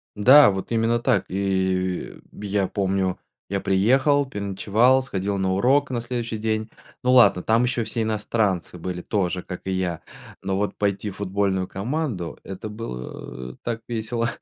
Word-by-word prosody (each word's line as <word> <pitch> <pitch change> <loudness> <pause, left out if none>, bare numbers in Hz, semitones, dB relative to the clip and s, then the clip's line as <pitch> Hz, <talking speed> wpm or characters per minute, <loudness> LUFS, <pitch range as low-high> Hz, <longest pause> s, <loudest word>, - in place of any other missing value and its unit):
Да, 130 +7 +8
вот 95 +1 -4
именно 115 +1 +2
так. - - +1
И 95 -1 -1 0.2
я 100 -1 -1
помню, 95 -2 -1 0.3
я 100 +1 -1
приехал, 130 +9 +3
переночевал, 105 +4 +2
сходил 100 -5 -2
на 95 -1 0
урок 135 +9 +3
на 120 -2 -1
следующий 120 -2 -3
день. 110 0 -2 0.3
Ну 125 0 +3
ладно, 100 -8 +6
там 115 +2 +3
еще 125 -1 0
все 115 - -3
иностранцы 105 -4 -1
были 90 +1 -5
тоже, 90 -2 -1
как 90 - -7
и 95 - -2
я, 90 -3 -2 0.4
но 95 0 -1
вот 105 +1 -1
пойти 100 0 -1
в 95 - -13
футбольную 95 -1 0
команду- 115 - -3
это 95 +2 -7
было 65 - -7
так 115 -1 -3
весело. 115 0 -2
100 Hz, 155 wpm, -24 LUFS, 95-115 Hz, 0.4 s, Да